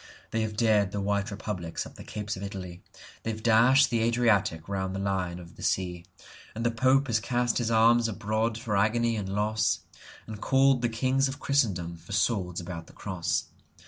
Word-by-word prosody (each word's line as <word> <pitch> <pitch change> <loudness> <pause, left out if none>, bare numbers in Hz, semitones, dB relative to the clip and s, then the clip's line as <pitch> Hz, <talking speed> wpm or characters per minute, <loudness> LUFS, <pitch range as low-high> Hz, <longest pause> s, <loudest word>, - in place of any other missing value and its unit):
They 115 - 0
have 110 -1 -3
dared 105 -4 +3
the 100 - -3
white 100 +2 0
republics 100 -5 -4
up - - -11
the - - -11
capes 105 0 -5
of 95 - -8
Italy, 95 -3 -7 0.4
They - - -4
have 110 -1 -5
dashed 120 +5 +5
the 115 - +2
Adriatic 110 -8 +2
round 95 -1 -2
the - - -3
Lion 95 -3 -2
of 85 -1 -13
the - - -11
Sea, 90 -2 -1 0.5
And 115 +1 -3
the 120 - +3
Pope 130 +4 +3
has 115 -5 +1
cast 120 +2 0
his 120 -2 -1
arms 115 +1 +4
abroad 110 +2 -1
for 115 -3 -2
agony 115 +3 +2
and 100 -3 -3
loss, 105 +2 0 0.4
And 110 -1 -8
called 135 -1 +3
the 120 - +1
kings 130 +4 +1
of 135 +2 -6
Christendom 95 - 0
for 85 +5 -10
swords 100 -4 0
about 85 -1 -7
the - - -16
Cross. 90 -4 -2
110 Hz, 195 wpm, -28 LUFS, 95-115 Hz, 0.5 s, dashed